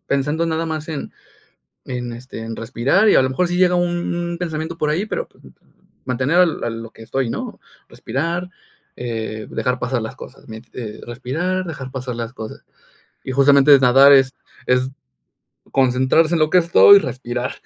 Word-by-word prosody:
pensando 150 +4 0
nada 165 0 -1
más 155 -1 -5
en 155 -3 -5 0.7
en 125 -2 -5
este, 120 +1 -9
en 115 0 -6
respirar 135 - +2
y - - +5
a - - +6
lo 130 - 0
mejor 175 +7 0
si 175 0 -2
llega 180 -1 +4
un 175 -1 -1
un 175 0 -3
pensamiento 165 -1 -4
por 150 -2 0
ahí, 170 +7 0
pero 485 - -4
p - - -28 0.7
mantener 130 +6 0
a 180 - +7
lo 165 - -3
a 120 - -1
lo 115 0 -7
que 115 - -13
estoy, 130 +2 -2
¿no? - - -5 0.3
Respirar, 170 +9 -3 0.5
eh, 110 -2 -5
dejar 125 0 -2
pasar 125 -1 -2
las 110 - -6
cosas, - - -13
mien 110 +1 -9
eh, 110 -3 -7
respirar, 160 +10 -3
dejar 140 -6 -7
pasar 125 -2 -5
las 115 +1 -5
cosas. 110 -3 -9 0.6
Y - - -5
justamente, 140 +1 +6
nadar 135 +2 +7
es 135 -1 +4 0.3
es 125 +1 +2 0.8
concentrarse 130 +5 +2
en - - +1
lo 155 - +3
que 180 - +5
estoy 175 +4 +7
y - - +8
respirar. 125 -5 -4
135 Hz, 185 wpm, -20 LUFS, 125-165 Hz, 0.8 s, y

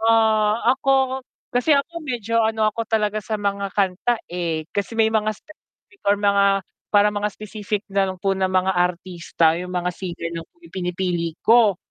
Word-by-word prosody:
Ah, 220 -1 +3
ako 265 0 +1 0.3
kasi 245 +5 +3
ako 335 +5 -1
medyo 230 -2 0
ano 220 0 -1
ako 230 +2 -3
talaga 215 -1 0
sa 215 +1 -4
mga 200 -1 -2
kanta, 200 +4 +1
eh, 170 -3 -2
kasi 200 +2 -3
may 220 -1 +3
mga 215 -1 +1
specific 310 - -22
or 200 - +5
mga 200 -1 +3 0.3
parang 205 0 +5
mga 210 +1 0
specific 210 -1 -4
na 195 0 +2
lang 185 -1 -5
po 195 0 +2
ng 190 -1 +1
mga 185 +1 +3
artista, 175 -2 +1
yung 180 +1 -6
mga 180 0 0
singer 170 -2 -5
lang 165 -1 -6
po - - -46
yung 335 - -16
pinipili 175 -2 -2
ko. 225 -5 +5
205 Hz, 175 wpm, -22 LUFS, 185-225 Hz, 0.3 s, or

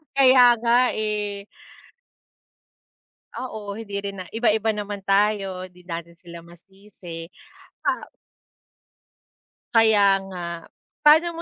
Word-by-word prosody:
Kaya 255 -3 +6
nga, 240 +2 +3
eh. 210 -2 -3 1.9
Oo, 215 -5 -6
hindi 205 -3 -8
rin 200 -1 -6
na 185 - -6
iba-iba 220 -1 +1
naman 205 -1 -5
tayo, 195 -2 +1
'di 180 0 -20
natin 170 0 -7
sila 170 -1 -12
masisi, 175 -1 -12 0.6
ah - - -1 1.7
Kaya 205 -4 +5
nga, 170 -3 -7 0.3
paano 315 +3 +5
mo 335 0 -8
205 Hz, 100 wpm, -23 LUFS, 185-225 Hz, 1.9 s, Kaya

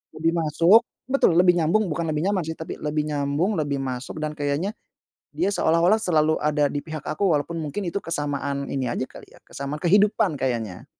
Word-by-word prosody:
lebih 165 +1 +1
masuk 170 +8 +5 0.2
betul, 260 -10 +2
lebih 180 0 +6
nyambung, 180 +4 +1
bukan 165 +1 -2
lebih 155 +1 -1
nyaman, 185 -4 0
sih, 160 - -4
tapi 160 - -7
lebih 150 0 -1
nyambung, 150 +6 0
lebih 145 -2 -1
masuk 130 +1 -5
dan 155 - -2
kayaknya 145 +6 -1 0.6
dia 200 - +1
seolah-olah 175 +2 +3
selalu 155 -6 +2
ada 150 -1 +1
di 145 - -3
pihak 155 0 -6
aku 195 +6 -1
walaupun 165 +3 -2
mungkin 155 +6 -4
itu 200 - -2
kesamaan 145 -4 -3
ini 135 -2 -2
aja 120 +2 -2
kali, - - -12
ya, - - -16
kesamaan 140 +2 -6
kehidupan 200 -3 +3
kayaknya. 115 -8 -3
155 Hz, 185 wpm, -24 LUFS, 145-175 Hz, 0.6 s, lebih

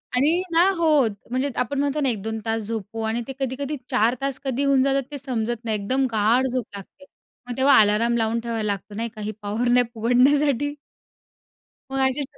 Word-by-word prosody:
.आणि 275 +5 +4 0.2
ना, 330 - +5 0.2
हो 335 -1 +1 0.4
म्हणजे 260 +3 0
आपण 275 +4 -4
म्हणतो 285 +1 0
ना, 275 - +2
1-2 220 0 -3
तास 225 0 -1
झोपू 225 0 -4
आणि 220 +2 -1
ते 270 - -5
कधी-कधी 275 +3 -3
4 225 +4 +2
तास 275 -1 -2
कधी 265 +1 -1
होऊन 275 -1 +4
जातात 275 0 +1
ते 290 - -4
समजत 240 -3 -3
नाही 220 -2 0
एकदम 260 +7 0
गाढ 225 +4 +2
झोप 250 -2 -2
लागते 200 +8 -13 0.4
मग 245 - -4
तेव्हा 270 +1 +5
अलार्म 220 +3 +2
लावून 225 0 0
ठेवायला 230 -2 -3
लागतो 205 0 -4
नाही 230 +2 -3
का, 215 - -8
ही 210 +1 -3
पॉवर 210 +4 -2
नॅप 245 0 +4
उघडण्यासाठी. 275 +4 +2 1.2
मग 270 - -1
अशी 265 +2 -2
245 Hz, 190 wpm, -23 LUFS, 220-275 Hz, 1.2 s, ना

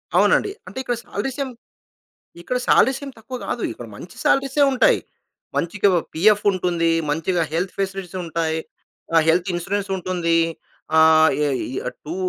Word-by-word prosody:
అవునండి. 405 - +4 0.2
అంటే - - -10
ఇక్కడ 245 - -1
సాలరీస్ 255 +7 -4
ఏం 270 - -5 0.9
ఇక్కడ 250 +8 -1
సాలరీస్ 265 +4 +4
ఏం 275 - -6
తక్కువ 235 +4 -7
కాదు. - - -3
ఇక్కడ - - -9
మంచి - - -11
సాలరీసే 275 +1 +2
ఉంటాయి. 260 - +4 0.6
మంచిగా 185 +4 +1 0.3
పిఎఫ్ 210 +5 +4
ఉంటుంది. 175 -3 0 0.2
మంచిగా 165 +3 0
హెల్త్ 180 +4 -1
ఫెసిలిటీస్ 195 -2 -3
ఉంటాయి. 160 -1 -1 0.6
ఆహ్, 165 - +6
హెల్త్ 175 +3 +3
ఇన్స్యూరెన్స్ 200 +4 -2
ఉంటుంది. 175 -2 0 0.6
ఆహ్, 160 0 +6 0.2
ఏ - - +1 0.6
టూ 155 - -5
185 Hz, 135 wpm, -22 LUFS, 165-215 Hz, 0.9 s, ఆహ్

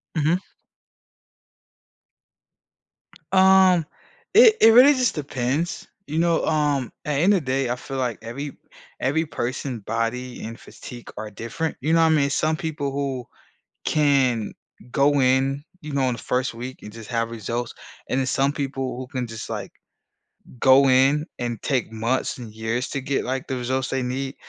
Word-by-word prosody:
Mhm. 160 +3 +2 2.9
Um, 190 -3 +6 0.5
it 450 -1 +8
it 225 - +9
really 260 +5 +8
just 255 -3 +1
depends. 145 +2 -2 0.2
You 155 +2 -2
know? 170 -1 +2
Um, 145 -5 0
at 145 -2 0
end 195 +5 +4
of 180 - +1
day, 130 -1 0
I 125 - 0
feel 135 +2 -7
like 125 -4 -2
every 135 +5 -6 0.5
every 160 +5 +1
person 125 -2 -4
body 115 +4 -3
and 115 +1 -7
physique 120 -1 -11
are 110 - -5
different. 115 +10 -4
You 155 +4 +1
know 165 - +5
what - - +5
I - - +3
mean? 145 -3 +3
Some 155 +3 +1
people 155 -4 -3
who 135 -3 -3 0.6
can 135 -7 +2 0.4
go 140 +2 +3
in, 135 +2 +2 0.2
you 150 -3 -7
know, 140 -1 +1
in 125 - 0
the - - -9
1st 125 +1 -1
week 125 +3 -7
and 105 - -9
just 115 -1 -10
have 115 -1 -1
results, 115 +1 -4 0.4
and 130 - +1
then 130 - -1
some 135 +2 +1
people 135 -3 -3
who 130 0 -6
can 125 -1 -4
just, 115 -1 -7
like, - - -5 0.9
go 135 +1 +6
in 135 +4 +4
and 120 -3 -3
take 130 -5 -1
months 115 +4 -1
and 115 -4 -9
years 110 +4 -2
to 140 - -2
get, 135 +1 -1
like, 130 +1 -3
the 130 - -3
results 130 +2 -1
they 135 -1 -1
need. 130 +2 -3
135 Hz, 165 wpm, -23 LUFS, 125-150 Hz, 2.9 s, it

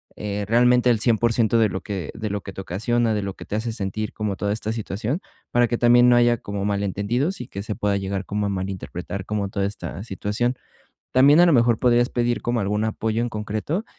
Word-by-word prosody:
eh, 105 -1 -3
realmente 125 +2 +4
al 115 - +1
100% 115 -1 +2
de 110 -2 +4
lo 95 - -4
que 95 -6 -5
de 110 -1 -4
lo 100 0 -3
que 95 - -9
te 95 - -6
ocasiona, 110 +5 0
de 105 - -1
lo 100 -1 -4
que - - -10
te - - -4
hace 115 +2 -2
sentir 105 0 -4
como 105 -2 -2
toda 100 +1 -1
esta 110 0 -3
situación, 110 - -3 0.3
para 120 0 +3
que 120 0 -2
también 120 +1 +6
no 120 - +6
haya 120 -1 +4
como 100 -2 -5
malentendidos 100 - -1
y 125 - -7
que 100 - -6
se 105 0 -3
pueda 100 -1 0
llegar 95 0 -3
como 105 +2 -2
a - - 0
malinterpretar 95 0 -5
como 105 -2 -2
toda 100 0 -1
esta 95 -3 -5
situación, 105 +3 -2 0.6
también, 140 +5 +6
a 175 - +8
lo 170 - +4
mejor, 120 -2 +4
podrías 120 0 +3
pedir 120 0 0
como 120 -1 -1
algún 105 +2 0
apoyo 110 +1 -1
en 120 - -1
concreto 110 - -3
110 Hz, 225 wpm, -23 LUFS, 100-120 Hz, 0.6 s, a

